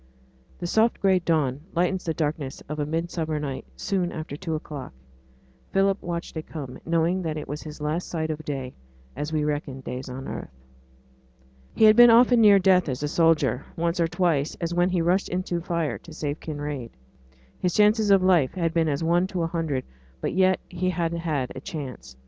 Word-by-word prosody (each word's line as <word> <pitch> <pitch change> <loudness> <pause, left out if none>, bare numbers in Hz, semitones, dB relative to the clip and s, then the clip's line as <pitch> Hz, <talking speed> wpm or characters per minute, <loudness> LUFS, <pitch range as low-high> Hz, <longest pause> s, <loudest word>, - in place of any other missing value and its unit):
The 175 - -5
soft 220 +6 +2
gray 190 -2 +4
dawn 150 -6 0
lightens 180 +2 0
the 165 - 0
darkness 150 -3 -3
of 150 +2 -5
a 145 - -1
midsummer 160 -1 -2
night 140 -3 -5
soon 185 -3 -1
after 155 -3 -6
two 160 0 -3
o'clock. 145 - -7 0.8
Philip 195 0 +2
watched 170 -1 -5
it 160 - -5
come, 140 -5 -7
knowing 170 +3 +1
that 160 -3 -3
it 150 - -6
was 145 +2 -5
his 155 -1 -9
last 155 +4 -2
sight 160 -2 -2
of 155 0 -5
day, 135 -4 -4 0.4
as 150 +3 -4
we 155 -1 0
reckon 145 -3 -3
days 125 +1 -6
on 130 +1 -7
earth. - - -6 1.3
He - - +2
had 215 0 +8
been 240 +1 +9
often 240 +1 +6
near 205 -2 +8
death 185 -4 +4
as 130 +2 -3
a - - +1
soldier; 150 -5 +2
once 170 +2 0
or 165 - +3
twice, 165 -4 0
as 170 0 -2
when 175 +1 +2
he 180 -2 +1
rushed 180 +3 +1
into 180 -1 -2
fire 170 -2 -2
to 170 - -14
save 150 -1 -3
Kinraid, 145 -5 -5 0.7
his 180 -2 0
chances 210 0 +4
of 195 -2 +5
life 175 -8 +3
had 165 -3 0
been 165 -2 +2
as 145 +2 -1
one 175 +3 +2
to 180 -3 -2
a - - +1
hundred; 160 -6 -2 0.4
but - - -2
yet 185 +1 +3
he 185 +1 -2
had 170 -2 -1
had 155 -6 -2
a 130 - -8
chance. 135 - -7
165 Hz, 195 wpm, -25 LUFS, 150-180 Hz, 1.3 s, been